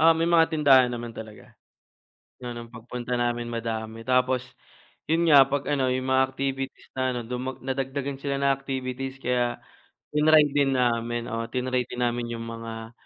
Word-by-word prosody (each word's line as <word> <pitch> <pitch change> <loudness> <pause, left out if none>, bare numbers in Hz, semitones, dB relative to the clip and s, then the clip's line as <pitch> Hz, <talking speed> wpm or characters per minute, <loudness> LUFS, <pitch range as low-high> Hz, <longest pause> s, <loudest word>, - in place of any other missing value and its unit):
Oo, 165 - +7
may 165 +1 +1
mga 170 -1 +6
tindahan 135 -5 +5
naman 120 -1 -5
talaga. 110 -1 -10 0.9
Ano 120 -1 -6
pagpunta 120 +1 -5
namin 120 -1 -1
madami 115 -1 -4
tapos 125 0 +2 0.6
'yon 165 +2 +2
nga 140 -2 +8
'pag 140 0 -1
ano, 135 -3 +1
yung 130 0 -1
mga 130 - +5
activities 135 0 -4
na 130 - -2
ano, 120 - -2 0.5
nadagdagan 135 +1 -3
sila 140 -1 -2
ng 140 0 +3
activities 135 -1 -4
kaya 120 -1 0 0.6
tinry 150 0 +6
din 140 -2 +2
namin, 120 -1 0
oo 115 0 -2
tinry 125 0 -1
din 125 - -5
namin 120 0 -1
yung 115 - -6
mga 115 0 -7
125 Hz, 155 wpm, -26 LUFS, 120-135 Hz, 0.9 s, nga